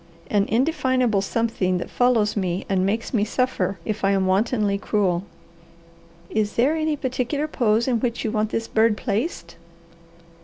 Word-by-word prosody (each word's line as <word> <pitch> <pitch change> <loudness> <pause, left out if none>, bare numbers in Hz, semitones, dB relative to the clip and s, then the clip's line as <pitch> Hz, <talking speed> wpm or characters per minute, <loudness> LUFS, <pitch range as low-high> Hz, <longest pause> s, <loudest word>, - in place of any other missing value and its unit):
"An 205 -1 +3
indefinable 255 - +1
something 200 -3 0
that 175 - -4
follows 235 -4 +2
me 185 -3 -2
and 190 -2 +1
makes 220 +6 -1
me 215 -4 +2
suffer 210 -5 -1
if 215 -1 -3
I 195 0 +3
am 190 -1 +1
wantonly 200 +1 +1
cruel." 190 -4 0 1.0
"Is 210 +1 -1
there 270 +7 +2
any 310 -1 0
particular 260 +3 -2
pose 230 -5 +1
in 245 -3 +1
which 235 0 -2
you 220 - -1
want 215 -1 0
this 225 0 -2
bird 220 -1 +2
placed?" 200 - -3
220 Hz, 155 wpm, -23 LUFS, 200-245 Hz, 1.0 s, An